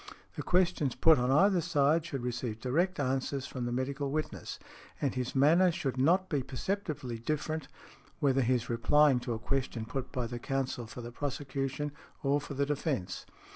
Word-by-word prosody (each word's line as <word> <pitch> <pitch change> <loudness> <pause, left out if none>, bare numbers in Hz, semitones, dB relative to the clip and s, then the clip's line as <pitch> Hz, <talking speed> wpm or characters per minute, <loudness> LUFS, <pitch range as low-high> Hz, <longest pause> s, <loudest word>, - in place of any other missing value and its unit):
"The - - -3
questions 175 -7 +2
put 160 -4 +6
on 125 +1 +1
either 185 +6 +5
side 155 0 +2
should 135 -4 -4
receive 120 -2 -3
direct 165 +9 0
answers 135 0 -1
from 125 -2 -4
the 120 - -2
medical 135 +3 -2
witness, 155 +2 -3 0.4
and 140 - 0
his 125 0 -3
manner 165 +7 +5
should 135 -6 -2
not 175 +9 +3
be 145 -6 0
perceptibly 135 - -3
different 155 +3 -2 0.5
whether 135 -3 +3
he 125 +1 +3
is 120 0 -2
replying 135 +3 +4
to 120 -1 -3
a - - -2
question 120 -1 -2
put 130 +3 -4
by 125 -3 -2
the 120 +1 -5
counsel 130 -3 -2
for 120 - -8
the 120 0 -7
prosecution, 140 +1 -3 0.3
or 140 +1 +2
for 145 0 -7
the 140 +1 +1
defence." 140 - -2
135 Hz, 175 wpm, -31 LUFS, 125-150 Hz, 0.5 s, put